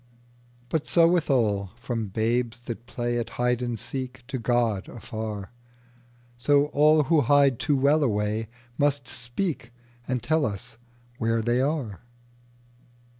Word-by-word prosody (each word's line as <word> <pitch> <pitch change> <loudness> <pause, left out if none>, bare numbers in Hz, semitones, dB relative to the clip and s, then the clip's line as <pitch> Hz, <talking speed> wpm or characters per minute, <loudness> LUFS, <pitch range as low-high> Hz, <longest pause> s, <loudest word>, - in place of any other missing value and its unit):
But 160 -3 -1
so 165 -1 +5
with 170 -2 +1
all, 105 -7 +1
from 120 -4 -3
babes 115 +4 -1
that 120 0 -7
playAt 120 -1 -2
hide 125 0 +1
and 120 -2 -2
seek 130 +1 -5
to 130 - -3
God 115 -4 0
afar, 110 -3 -6 0.9
So 145 +3 +4
all 150 +1 +5
who 155 +2 +3
hide 140 -1 +4
too 145 -3 +1
well 140 +4 +4
awayMust 120 +4 -1
speak 120 +2 -3 0.4
and 125 -2 -1
tell 155 +4 +2
us 100 -2 -4 0.4
where 115 0 +1
they 120 +2 +2
are. 135 - -2
120 Hz, 125 wpm, -26 LUFS, 115-140 Hz, 0.9 s, so